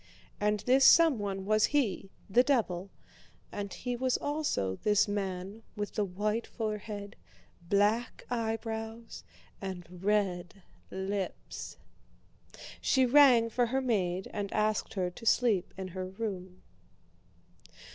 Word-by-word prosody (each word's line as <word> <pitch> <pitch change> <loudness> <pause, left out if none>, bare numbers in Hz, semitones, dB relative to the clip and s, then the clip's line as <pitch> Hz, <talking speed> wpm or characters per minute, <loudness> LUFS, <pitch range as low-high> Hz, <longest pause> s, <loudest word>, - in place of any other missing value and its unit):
And 210 0 +1
this 260 +2 +4
someone 205 - +5
was 215 +1 +4
he—the 220 -4 0
devil—and 200 -3 -4
he 245 +5 -4
was 255 +1 +1
also 285 - -1
this 210 0 +3
man 195 +1 -4
with 205 -1 -4
the 210 - 0
white 210 +4 -2
forehead, 210 -2 -5 0.5
black 210 +5 +1
eyebrows, 225 0 -4 0.4
and 185 -3 -6 0.2
red 195 -3 0 0.3
lips. 190 - -5 1.0
She 260 -1 +3
rang 250 -3 +6
for 245 +1 +2
her 260 +3 0
maid 190 -8 0
and 200 -1 -3
asked 215 0 0
her 180 -2 -1
to 230 - -12
sleep 220 -8 +3
in 190 -1 -5
her 185 +1 -5
room. 185 -2 -6
210 Hz, 110 wpm, -30 LUFS, 190-230 Hz, 1.0 s, rang